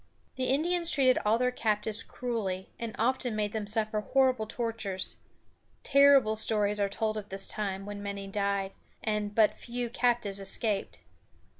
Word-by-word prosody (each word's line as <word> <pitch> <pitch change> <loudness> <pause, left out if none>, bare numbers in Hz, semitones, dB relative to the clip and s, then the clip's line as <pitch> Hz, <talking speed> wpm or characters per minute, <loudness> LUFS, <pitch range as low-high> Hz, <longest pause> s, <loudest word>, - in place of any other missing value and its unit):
The 260 -2 -2
Indians 335 +6 +2
treated 265 -5 +4
all 215 +2 +3
their 250 +1 +1
captives 215 -2 -1
cruelly, 205 -7 -4
and 230 -2 -5
often 245 0 0
made 210 -1 -1
them 215 -2 -4
suffer 215 0 +1
horrible 255 -1 +1
tortures. 220 -5 -3 0.7
Terrible 275 -5 +5
stories 210 -1 +1
are 200 -1 +1
told 215 +1 -2
of 210 -1 -7
this 195 0 +1
time, 195 -2 -3
when 205 0 -7
many 200 -1 -5
died, 200 -1 -1 0.3
and 210 -1 -2
but 220 -2 +4
few 240 -1 -5
captives 235 -5 0
escaped. 195 +1 0
215 Hz, 150 wpm, -29 LUFS, 205-245 Hz, 0.7 s, Terrible